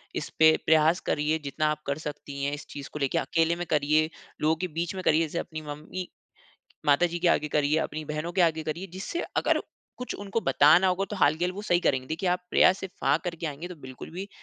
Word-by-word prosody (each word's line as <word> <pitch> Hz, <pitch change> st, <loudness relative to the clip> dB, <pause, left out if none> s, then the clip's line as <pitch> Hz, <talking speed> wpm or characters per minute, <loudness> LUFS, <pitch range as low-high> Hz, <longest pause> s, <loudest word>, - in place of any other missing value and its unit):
इस -, -, -3 dB
पे 160 Hz, 0 st, +7 dB
प्रयास 160 Hz, +2 st, +4 dB
करिए, 155 Hz, +2 st, +1 dB
जितना 150 Hz, +1 st, -1 dB
आप 150 Hz, 0 st, -2 dB
कर 140 Hz, +1 st, -1 dB
सकती 140 Hz, -1 st, -6 dB
हैं 140 Hz, +1 st, 0 dB
इस 145 Hz, -1 st, -6 dB
चीज़ 140 Hz, -2 st, -8 dB
को 150 Hz, -, -5 dB
लेके। 135 Hz, -2 st, 0 dB
अकेले 165 Hz, +1 st, +1 dB
में 175 Hz, +1 st, -4 dB
करिए, 155 Hz, +1 st, +3 dB, 0.3 s
लोगों 155 Hz, +1 st, +3 dB
के 185 Hz, -, 0 dB
बीच 170 Hz, +2 st, -3 dB
में 185 Hz, -, -5 dB
करिए, 160 Hz, -1 st, +4 dB
जैसे 165 Hz, +1 st, -2 dB
अपनी 155 Hz, -2 st, -6 dB
मम्मी 155 Hz, +5 st, -6 dB, 0.8 s
माताजी 170 Hz, +4 st, +3 dB
के 175 Hz, 0 st, +2 dB
आगे 150 Hz, -2 st, +2 dB
करिए, 150 Hz, +1 st, +2 dB
अपनी 155 Hz, -1 st, -3 dB
बहनों 155 Hz, +3 st, -4 dB
के 190 Hz, -, 0 dB
आगे 160 Hz, -2 st, +2 dB
करिए, 170 Hz, +5 st, -4 dB
जिससे 195 Hz, -, -4 dB, 0.2 s
अगर -, -, +2 dB, 0.4 s
कुछ 250 Hz, -, -4 dB
उनको 205 Hz, +2 st, -3 dB
बताना 165 Hz, 0 st, +5 dB
होगा, 185 Hz, +2 st, +1 dB
तो 210 Hz, -, -3 dB
हाल 150 Hz, -4 st, +4 dB
के 175 Hz, -, -1 dB
हाल 180 Hz, -, 0 dB
वो 205 Hz, +3 st, -7 dB
सही 175 Hz, -4 st, +2 dB
करेंगे। 130 Hz, -6 st, +1 dB
देखिए, 165 Hz, +4 st, -1 dB
आप 180 Hz, 0 st, +1 dB
प्रयास 190 Hz, -, +5 dB
से 190 Hz, -, -5 dB
फ़ा 140 Hz, +2 st, +3 dB
करके 170 Hz, -2 st, -4 dB
आएँगे, 150 Hz, +4 st, -5 dB
तो 180 Hz, -, -8 dB
बिल्कुल 130 Hz, +2 st, -9 dB
भी 190 Hz, +4 st, -6 dB
160 Hz, 235 wpm, -27 LUFS, 150-175 Hz, 0.8 s, पे